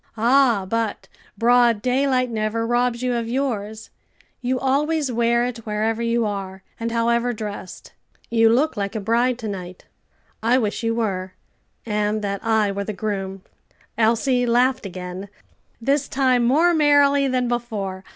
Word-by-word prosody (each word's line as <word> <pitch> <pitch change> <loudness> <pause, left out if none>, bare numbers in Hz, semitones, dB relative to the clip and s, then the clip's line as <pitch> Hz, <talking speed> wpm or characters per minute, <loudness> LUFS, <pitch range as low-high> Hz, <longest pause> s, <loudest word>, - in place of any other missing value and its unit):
"Ah, 235 -3 +3
but 225 0 -2 0.3
broad 235 0 +4
daylight 255 +1 +1
never 220 +1 -1
robs 240 +1 0
you 250 -1 0
of 235 -1 -2
yours; 220 -5 -3 0.5
you 255 +1 -1
always 285 +2 0
wear 235 0 +2
it 245 -2 -4
wherever 220 +1 -2
you 235 0 +1
are, 195 -2 -5 0.2
and 230 0 -3
however 235 +1 +1
dressed. 210 -4 -8 0.4
You 225 -1 +4
look 265 +7 +2
like 200 0 -3
a - - -1
bride 235 +4 +1
to 225 -3 -6
night; 185 -3 -7 0.6
I 235 +3 +3
wish 215 -5 -1
you 230 0 0
were, 190 -5 -2 0.5
and 210 -1 -1
that 200 -1 -3
I 220 -2 +2
were 200 0 -3
the 215 - -4
groom." 195 -2 -4 0.5
Elsie 245 +3 +2
laughed 250 0 +2
again, 185 +1 -7 0.5
this 275 +4 0
time 255 -3 +2
more 320 +8 +4
merrily 285 -2 +4
than 255 -1 0
before. 215 -6 -3
230 Hz, 150 wpm, -22 LUFS, 210-250 Hz, 0.6 s, broad